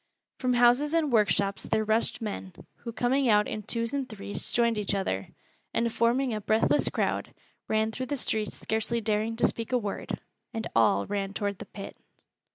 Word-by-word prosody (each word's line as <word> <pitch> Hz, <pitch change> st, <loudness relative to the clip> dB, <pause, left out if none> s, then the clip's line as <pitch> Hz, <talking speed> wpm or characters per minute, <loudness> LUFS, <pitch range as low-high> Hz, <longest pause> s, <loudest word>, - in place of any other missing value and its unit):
From 255 Hz, -1 st, +1 dB
houses 245 Hz, +6 st, +4 dB
and 310 Hz, -4 st, +2 dB
workshops 200 Hz, -2 st, +3 dB
there 220 Hz, 0 st, 0 dB
rushed 220 Hz, +1 st, +1 dB
men, 195 Hz, -3 st, -5 dB, 0.2 s
who 235 Hz, -, -7 dB
coming 250 Hz, +3 st, +2 dB
out 210 Hz, -1 st, +4 dB
in 215 Hz, -, -3 dB
twos 230 Hz, +3 st, -2 dB
and 275 Hz, -2 st, -2 dB
threes 205 Hz, -2 st, -5 dB
joined 235 Hz, -2 st, +2 dB
each 200 Hz, -1 st, 0 dB
other, 95 Hz, -, -1 dB, 0.5 s
and 230 Hz, -1 st, +1 dB
forming 240 Hz, +2 st, +2 dB
a 215 Hz, -, -2 dB
breathless 220 Hz, +2 st, +3 dB
crowd, -, -, -1 dB, 0.3 s
ran 220 Hz, 0 st, +1 dB
through 255 Hz, +3 st, -4 dB
the 285 Hz, -, -2 dB
streets 220 Hz, -4 st, -2 dB
scarcely 220 Hz, +2 st, -1 dB
daring 220 Hz, +1 st, 0 dB
to 230 Hz, -, +2 dB
speak 230 Hz, +1 st, -1 dB
a 250 Hz, -, +4 dB
word 205 Hz, -4 st, -4 dB, 0.4 s
and 225 Hz, 0 st, -2 dB
all 110 Hz, -3 st, +4 dB
ran 200 Hz, -1 st, -2 dB
toward 200 Hz, -2 st, -2 dB
the -, -, -8 dB
pit. 200 Hz, -1 st, -9 dB
220 Hz, 180 wpm, -28 LUFS, 205-240 Hz, 0.5 s, houses